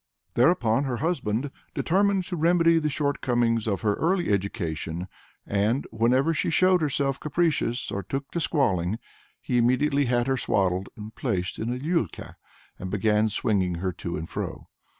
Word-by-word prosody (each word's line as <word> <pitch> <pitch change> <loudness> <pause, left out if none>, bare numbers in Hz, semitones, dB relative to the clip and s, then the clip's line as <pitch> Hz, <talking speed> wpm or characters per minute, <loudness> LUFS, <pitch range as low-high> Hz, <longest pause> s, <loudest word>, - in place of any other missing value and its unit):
Thereupon 125 -2 +3
her 125 -3 -2
husband 135 -4 -1 0.2
determined 195 +1 +2
to 180 - -4
remedy 165 0 +4
the 155 -1 0
short 145 0 -1
comings 115 -3 +1
of 100 -3 -1
her 105 -2 +2
early 175 +1 +1
education, 90 -4 -2 0.4
and 105 +6 0
"whenever 125 +8 +2
she - - 0
showed 185 +2 +4
herself 140 -2 0
capricious, 150 -6 0
or 100 - -2
took 135 +9 -5
to 170 - -2
squalling, 110 - +1 0.4
he 125 - 0
immediately 140 +4 +2
had 120 -1 +1
her 135 0 +1
swaddled 95 -4 0
and 110 +1 -8
placed 95 -8 -2
in 115 +2 -2
a 125 - -2
liulka, 145 - -2 0.4
and 95 - -5
began 105 +2 +2
swinging 100 -5 0
her 95 +2 -2
to 85 - -5
and 80 +2 -7
fro." - - -5
120 Hz, 160 wpm, -26 LUFS, 105-150 Hz, 0.4 s, remedy